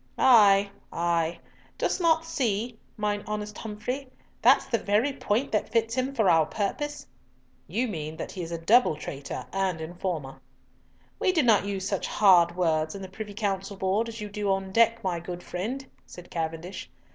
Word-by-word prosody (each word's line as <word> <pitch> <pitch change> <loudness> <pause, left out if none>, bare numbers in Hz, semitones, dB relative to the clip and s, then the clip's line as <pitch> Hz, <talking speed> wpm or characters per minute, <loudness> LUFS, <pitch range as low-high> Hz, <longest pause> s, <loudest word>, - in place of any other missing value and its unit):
"Ay, 205 -5 +6 0.2
ay. 170 -1 0 0.4
Dost - - 0
not 325 -1 +3
see, 240 -7 -1 0.2
mine 210 -1 -1
honest 210 0 -4
Humfrey, 230 +6 -4 0.3
that's - - +5
the 230 - 0
very 215 +9 +1
point 255 -1 -1
that 210 - 0
fits 225 0 +1
him 260 +2 0
for 220 -6 +2
our 160 -3 +5
purpose?" 295 - -3 0.6
"You 250 +3 0
mean 155 -6 -5
that - - -5
he 185 - -6
is 165 0 -6
a 170 - -2
double 205 +3 +4
traitor 140 -2 -6
and 190 -3 0
informer." 160 -4 -5 0.8
"We 370 - +3
do 325 -5 +2
not 220 -4 +4
use 195 -1 -2
such 195 - -1
hard 175 -4 +5
words 160 -2 +1
in 195 - -7
the 190 - -7
Privy 205 +1 -7
Council 195 -2 -2
Board 195 +5 0
as 230 0 -8
you 210 - -4
do 205 0 -2
on 195 0 -1
deck, 230 +2 +3
my 180 -3 -1
good 175 +1 -7
friend," 240 +10 -4 0.2
said 180 0 -12
Cavendish. 165 +2 -4
200 Hz, 175 wpm, -27 LUFS, 175-230 Hz, 0.8 s, Ay